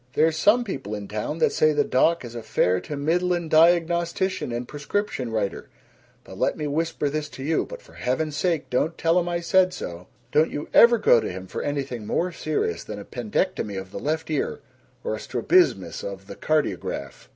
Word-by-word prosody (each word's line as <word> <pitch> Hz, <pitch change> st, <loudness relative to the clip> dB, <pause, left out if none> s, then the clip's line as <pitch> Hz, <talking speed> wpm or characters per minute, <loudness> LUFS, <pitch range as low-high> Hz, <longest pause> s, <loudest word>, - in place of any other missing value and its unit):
"There's 160 Hz, +1 st, +3 dB
some 210 Hz, +9 st, +4 dB
people 135 Hz, -, -5 dB
in 100 Hz, -1 st, -6 dB
town 110 Hz, +9 st, -3 dB
that -, -, +3 dB
say 155 Hz, 0 st, +3 dB
the 145 Hz, 0 st, +3 dB
doc 160 Hz, +3 st, +2 dB
is 120 Hz, -, -8 dB
a 120 Hz, -, -5 dB
fair 90 Hz, -4 st, +1 dB
to 150 Hz, -, -6 dB
middlin' 175 Hz, +3 st, 0 dB
diagnostician 170 Hz, +1 st, +2 dB
and 120 Hz, +1 st, -3 dB
prescription 145 Hz, -, -3 dB
writer, 110 Hz, -3 st, -2 dB, 0.5 s
but -, -, -11 dB
let -, -, +1 dB
me 150 Hz, -, -3 dB
whisper 155 Hz, +1 st, -1 dB
this 150 Hz, +1 st, -2 dB
to 135 Hz, -, -9 dB
you 160 Hz, +3 st, 0 dB
but -, -, -9 dB
for -, -, -18 dB
heaven's 145 Hz, +4 st, -2 dB
sake 165 Hz, -1 st, -1 dB
don't 155 Hz, +6 st, 0 dB
tell 165 Hz, +2 st, +3 dB
him 175 Hz, 0 st, -2 dB
I 170 Hz, 0 st, -1 dB
said 185 Hz, +1 st, +3 dB
so 85 Hz, -, -7 dB, 0.2 s
don't 155 Hz, +2 st, +4 dB
you 145 Hz, -, -5 dB
ever 235 Hz, 0 st, +8 dB
go 165 Hz, -, +5 dB
to -, -, -3 dB
him 95 Hz, +1 st, -7 dB
for -, -, -5 dB
anything 135 Hz, -6 st, -3 dB
more 180 Hz, +2 st, 0 dB
serious 150 Hz, -, -2 dB
than 105 Hz, -, -7 dB
a 100 Hz, -, -8 dB
pendectomy 115 Hz, -, -2 dB
of 95 Hz, 0 st, -9 dB
the -, -, -5 dB
left 160 Hz, +2 st, -2 dB
ear 150 Hz, -, -1 dB, 0.4 s
or 485 Hz, -, -2 dB
a -, -, -3 dB
strabismus 365 Hz, +5 st, +1 dB
of -, -, -6 dB
the -, -, -9 dB
cardiograph." 150 Hz, -, -2 dB
155 Hz, 200 wpm, -24 LUFS, 125-175 Hz, 0.5 s, ever